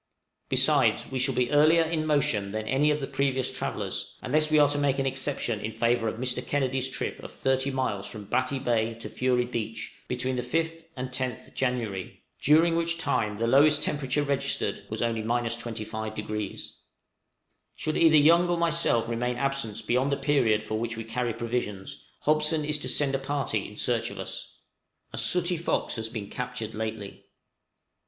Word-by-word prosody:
Besides, - - +3
we 130 - -1
shall 130 0 +1
be 125 +1 +1
earlier 155 +3 +5
in 160 -1 -1
motion 110 -9 +1
than 110 0 -3
any 140 +3 +3
of 150 0 +1
the - - -1
previous 135 -1 0
travellers, - - -4
unless 155 +4 +2
we 155 - +4
are 145 -1 +7
to 145 0 0
make 140 -2 +2
an 135 - 0
exception 135 -4 -1
in 110 +1 -4
favor 115 +1 +1
of - - -2
Mr. 125 0 -1
Kennedy's 135 -2 0
trip - - -4
of - - -9
30 135 +1 0
miles 130 -7 -2
from 105 -2 -8
Batty 130 +6 0
Bay 115 -3 0
to 115 - -8
Fury 125 -1 +1
Beach, 115 -2 -4
between 125 +1 -2
the - - 0
5th 165 +3 -2
and 130 0 -3
10th 130 -2 -4
January, 115 -8 -3 0.2
during 165 +3 +5
which 170 0 +1
time 110 -10 0
the 115 - 0
lowest 145 +5 +5
temperature 145 0 0
registered 140 -1 -1
was - - -2
only 115 -1 0
25°. 110 -2 -3 1.0
Should 155 - -2
either 160 -2 +6
Young 170 +4 +5
or 175 - +1
myself 165 -9 +2
remain 120 +1 -1
absent 125 -5 -2
beyond 130 +5 +1
the 140 - +1
period 135 -7 +2
for 110 0 -3
which 115 0 -3
we 115 - -4
carry 120 +2 -2
provisions, 115 -5 -4 0.2
Hobson 155 0 +2
is 150 0 0
to - - -1
send 140 -2 +3
a 135 - +1
party 140 +1 -2
in - - -12
search - - 0
of - - -9
us. - - -7 0.6
A - - -3
sooty 180 0 +2
fox 165 - -1
has 110 0 -3
been 110 -3 -5
captured 125 -3 -5
lately. 110 -2 -5
130 Hz, 175 wpm, -27 LUFS, 115-145 Hz, 1.0 s, are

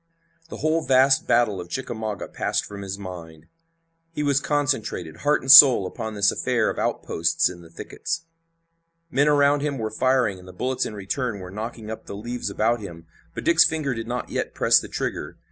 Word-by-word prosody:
The - - -8
whole 155 +1 0
vast 135 0 +3
battle 110 -6 +2
of 85 - -11
Chickamauga 110 -3 -5
passed - - -2
from 100 -1 -9
his 95 0 -5
mind. 85 -5 -10 0.7
He 150 -3 -3
was 140 -2 +2
concentrated, 130 - -2
heart 150 +1 +1
and 130 - +3
soul, 135 - +9
upon 110 +4 -6
this 100 0 +3
affair - - 0
of - - -7
outposts 80 +2 0
in 85 -1 -12
the 85 - -15
thickets. 125 - -5 0.9
Men 145 +1 +2
around 145 -1 +3
him 145 -2 -2
were 110 -2 -4
firing, 125 -4 +1
and 90 - -15
the 90 - -11
bullets 130 +7 -2
in 105 - -8
return 105 +2 -3
were 90 -1 -9
knocking 110 +1 -7
up 110 - -9
the - - -7
leaves 120 +2 -5
about 115 +4 0
him, 85 -5 -10 0.3
but - - -5
Dick's 170 - +5
finger 155 -4 -1
did 115 -1 -6
not 125 +1 -4
yet - - -4
press - - +4
the - - -8
trigger. - - -4
115 Hz, 195 wpm, -23 LUFS, 100-135 Hz, 0.9 s, soul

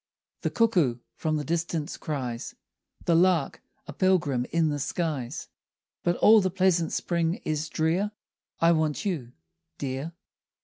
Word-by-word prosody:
The - - 0
cuckoo 180 - +2 0.2
from 155 -1 -1
the 150 - -2
distance 165 0 -2
cries, 130 -7 -4 0.5
The 170 - +3
lark 170 -3 +3 0.2
a - - -8
pilgrim 155 -10 +2
in 165 -2 +2
the 145 -1 -2
skies; 145 -4 -3 0.5
But 175 - +1
all 220 +3 +7
the 185 - +1
pleasant 185 -2 +2
spring 170 -1 0
is 155 0 -1
drear. 170 +6 +1 0.5
I 165 0 +5
want 155 +1 0
you, 145 -12 -3 0.4
dear! 135 +4 -4
165 Hz, 135 wpm, -27 LUFS, 145-175 Hz, 0.5 s, all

